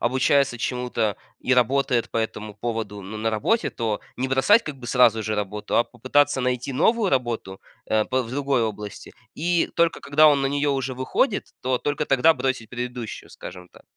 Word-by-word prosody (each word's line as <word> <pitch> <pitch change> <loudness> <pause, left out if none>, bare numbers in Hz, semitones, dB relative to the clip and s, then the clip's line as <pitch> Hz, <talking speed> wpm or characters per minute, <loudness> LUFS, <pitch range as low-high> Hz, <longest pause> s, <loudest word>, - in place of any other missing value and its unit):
обучается 130 +1 +2
чему-то 125 -4 -1 0.2
и 130 - 0
работает 125 -1 +2
по - - -4
этому 110 -2 -3
поводу, 110 -2 -4
ну, 105 +3 -7
на 110 +1 0
работе, 220 - 0
то 110 -3 -2 0.2
не 130 - -1
бросать, 170 +13 +4
как 150 -2 -6
бы, 125 -2 -10
сразу 115 -3 +4
же 110 0 -2
работу, 105 +1 -3
а 120 - +4
попытаться 140 +3 +1
найти 125 +1 -1
новую 210 - +2
работу, 120 -7 -2 0.3
э, 110 -1 +2
пэ 130 0 0
в 115 - -9
другой 135 -2 0
области, 105 -2 -6 0.2
и 170 +2 +1
только 170 -1 +2
когда 155 +2 +5
он 140 -2 +3
на 135 - +1
нее 145 +1 0
уже 135 -1 -2
выходит, 130 +1 -1
то 130 0 0
только 145 +1 -2
тогда 140 +5 +5
бросить 130 -5 -3
предыдущую, 125 -2 -6
скажем 90 0 -10
так. - - -19
125 Hz, 185 wpm, -24 LUFS, 110-140 Hz, 0.3 s, когда